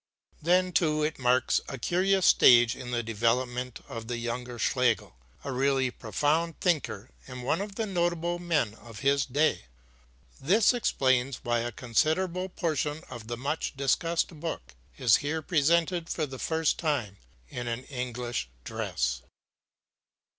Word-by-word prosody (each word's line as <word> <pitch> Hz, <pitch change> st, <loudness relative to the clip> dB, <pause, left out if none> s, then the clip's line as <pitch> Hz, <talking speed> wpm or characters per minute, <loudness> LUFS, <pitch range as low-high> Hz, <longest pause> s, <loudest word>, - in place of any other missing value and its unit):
HADER] -, -, -30 dB
Then, 180 Hz, +1 st, +3 dB
too, 155 Hz, -3 st, +2 dB
it 155 Hz, -1 st, -2 dB
marks 125 Hz, 0 st, +2 dB
a 135 Hz, -, -5 dB
curious 185 Hz, +8 st, +2 dB
stage 120 Hz, -1 st, +6 dB
in 125 Hz, -2 st, -8 dB
the 120 Hz, -1 st, -1 dB
development 120 Hz, +3 st, -1 dB
of 115 Hz, -1 st, -7 dB
the 120 Hz, 0 st, -3 dB
younger 120 Hz, +1 st, -4 dB
Schlegel, 120 Hz, -, +1 dB, 0.3 s
a 140 Hz, -, -4 dB
really 135 Hz, 0 st, +1 dB
profound 150 Hz, +9 st, -1 dB
thinker 140 Hz, -, -1 dB, 0.2 s
and 130 Hz, -1 st, -8 dB
one 160 Hz, +8 st, 0 dB
of 200 Hz, -1 st, -6 dB
the 225 Hz, -, -1 dB
notable 175 Hz, -2 st, -1 dB
men 160 Hz, -11 st, 0 dB
of 115 Hz, 0 st, -12 dB
his 140 Hz, 0 st, +2 dB
day. 145 Hz, -, +1 dB, 0.8 s
This 200 Hz, -, +4 dB
explains 130 Hz, -, +1 dB
why 120 Hz, 0 st, +1 dB
a 120 Hz, +1 st, -3 dB
considerable 165 Hz, -, 0 dB
portion 155 Hz, -3 st, -2 dB
of 120 Hz, -3 st, -8 dB
the 120 Hz, 0 st, -4 dB
much 140 Hz, +2 st, -3 dB
discussed 165 Hz, +5 st, +1 dB
book 105 Hz, -, -5 dB, 0.2 s
is 125 Hz, -5 st, +5 dB
here 155 Hz, +2 st, -3 dB
presented 170 Hz, +2 st, +2 dB
for 155 Hz, -, -1 dB
the 135 Hz, -2 st, -9 dB
first 160 Hz, -1 st, 0 dB
time 130 Hz, -, -1 dB, 0.3 s
in 120 Hz, 0 st, -5 dB
an 120 Hz, +2 st, -3 dB
English 125 Hz, -, -4 dB
dress. -, -, -2 dB
135 Hz, 145 wpm, -28 LUFS, 120-165 Hz, 0.8 s, stage